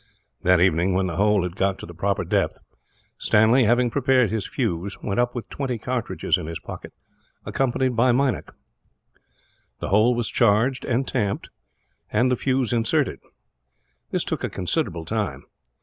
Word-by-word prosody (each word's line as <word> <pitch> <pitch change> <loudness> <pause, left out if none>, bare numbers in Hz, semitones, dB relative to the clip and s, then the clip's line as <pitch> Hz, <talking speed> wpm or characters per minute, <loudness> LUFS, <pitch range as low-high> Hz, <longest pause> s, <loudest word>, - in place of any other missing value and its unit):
That 90 -1 +4
evening, 90 +1 +2
when 95 0 +2
the 85 -3 -3
hole 105 -1 +3
had 90 -1 -4
got 95 -1 0
to - - -9
the 85 - -10
proper 100 +4 -1
depth, - - 0 0.6
Stanley, 115 +4 +4
having 120 +2 +3
prepared 130 -5 +2
his 110 -3 -2
fuse, 100 - -2
went 100 +3 -1
up 120 0 +1
with 120 - -5
twenty 130 -4 -3
cartridges 125 +2 -1
in 80 - -6
his 85 0 -4
pocket, - - -9 0.5
accompanied 130 -1 0
by 120 +2 +4
Meinik. 130 +1 0 1.3
The - - -4
hole 110 +5 +4
was 120 -1 -1
charged 120 +4 +2
and 130 +2 0
tamped, 100 -1 -2 0.6
and 120 +4 +2
the - - +3
fuse 130 -1 0
inserted. 115 -1 +1 0.9
This - - -1
took - - -3
a - - -1
considerable 85 -1 -2
time. 105 +2 -3
110 Hz, 160 wpm, -23 LUFS, 95-125 Hz, 1.3 s, That